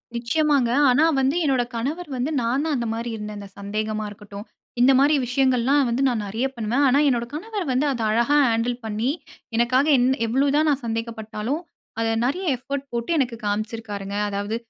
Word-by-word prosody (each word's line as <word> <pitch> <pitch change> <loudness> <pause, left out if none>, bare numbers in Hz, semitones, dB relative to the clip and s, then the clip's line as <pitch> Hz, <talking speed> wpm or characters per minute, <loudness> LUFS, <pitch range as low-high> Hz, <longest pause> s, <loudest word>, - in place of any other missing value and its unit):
நிச்சியமாங்க. 270 +1 +1 0.2
ஆனா, 280 +5 +4 0.2
வந்து 270 +3 +1
என்னோட 260 -3 +2
கணவர் 295 +8 -3
வந்து 265 +6 -1
நான் 245 +5 0
தான் 310 - 0
அந்த 235 -1 -2
மாரி 230 +1 -4
இருந்தேன் 210 -1 -6
அந்த 200 - -9
சந்தேகமா 215 +1 -3
இருக்கட்டும். 205 +1 -10 0.4
இந்த 260 - +6
மாரி 290 +3 +4
விஷயங்கள்லாம் 260 +2 +2
வந்து 240 +3 0
நான் 225 -4 -1
நெறைய 225 +6 -2
பண்ணுவேன். 235 +4 0
ஆனா, 270 +2 +4
என்னோட 235 -2 0
கணவர் 405 +4 -4
வந்து 270 +4 +1
அத 240 -3 -3
அழகா 235 +6 +3
ஹேண்டில் 230 +1 0
பண்ணி 220 +3 -1 0.5
எனக்காக 255 +4 +3
என் 245 +1 +3 0.2
எவ்ளோ 265 +5 +2
தான் 310 0 +3
நான் 280 -2 0
சந்தேகப்பட்டாலும். 225 +4 -3 0.4
அத 225 - +1 0.2
நெறைய 360 +9 -1
எஃபோர்ட் 275 +2 -5
போட்டு 235 +5 -2
எனக்கு 245 -4 0
காமிச்சிருக்காருங்க. 205 -1 -3
அதாவது 205 +2 -3
240 Hz, 170 wpm, -23 LUFS, 220-275 Hz, 0.5 s, இந்த